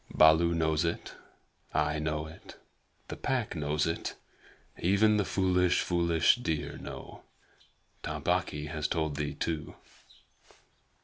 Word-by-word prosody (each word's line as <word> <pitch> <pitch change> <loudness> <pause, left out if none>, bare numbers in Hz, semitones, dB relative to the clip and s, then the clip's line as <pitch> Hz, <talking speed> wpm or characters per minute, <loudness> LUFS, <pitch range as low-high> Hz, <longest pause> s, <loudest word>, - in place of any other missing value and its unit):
Baloo 80 +2 +6
knows 80 -1 +1
it; 85 - -3 0.6
I 75 +1 +1
know 75 0 -2
it; 80 +1 -12 0.5
the - - -4
Pack 120 -7 -1
know 75 -1 -1
it; 75 +1 +2
and 80 - -3 0.7
even 105 +4 +4
the 105 - +1
foolish, 90 -2 +2
foolish 85 +1 +3
deer 80 -11 -3
know. - - -9 0.8
Tabaqui 75 0 -1
has 75 -1 -2
told 80 -3 -1
thee 75 0 -3
too." 80 -3 -3
80 Hz, 120 wpm, -30 LUFS, 75-90 Hz, 0.8 s, Baloo